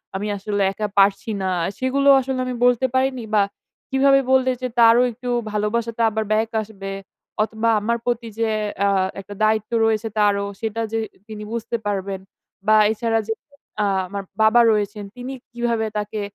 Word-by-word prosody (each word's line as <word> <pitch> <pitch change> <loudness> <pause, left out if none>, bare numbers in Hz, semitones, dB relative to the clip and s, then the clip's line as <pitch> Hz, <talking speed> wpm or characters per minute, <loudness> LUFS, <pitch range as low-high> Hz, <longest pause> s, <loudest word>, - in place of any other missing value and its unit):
আমি 205 +2 -2
আসলে 205 +1 -2
একা 210 +2 -3
পারছি 195 +2 +3
না, 190 - 0 0.3
সেগুলোও 275 +2 +4
আসলে 260 0 -3
আমি 255 0 -3
বলতে 245 +1 +3
পারিনি 260 -2 +1
বা 205 - +5 0.5
কিভাবে 275 +1 +4
বললে 260 0 +4
যে 255 - -1
তারও 230 +1 +7
একটু 245 +2 -7 0.2
ভালোবাসাটা 225 +2 -1
আবার 220 0 -2
ব্যাক 220 +1 +2
আসবে 200 -2 -8 0.5
অথবা 220 +1 -1
আমার 235 +2 0
প্রতি 240 -1 -1
যে 225 -1 +1 0.4
আ - - +3 0.3
একটা 200 +1 -10
দায়িত্ব 215 +1 +1
রয়েছে 220 0 +1
তারও 200 -1 +2 0.2
সেটা 225 0 -2
যে 225 - 0 0.3
তিনি 215 -1 -7
বুঝতে 235 0 -3
পারবেন। 195 -1 -2 0.5
বা 215 - +6 0.2
এছাড়া 225 +1 0
যে 225 - 0 0.5
আ - - +2 0.2
আমার 200 +1 -5 0.2
বাবা 220 +2 +6
রয়েছেন, 210 -1 -1
তিনি 250 +2 -6 0.2
কিভাবে 235 -2 -1
তাকে 210 0 -3
220 Hz, 160 wpm, -22 LUFS, 210-240 Hz, 0.5 s, তারও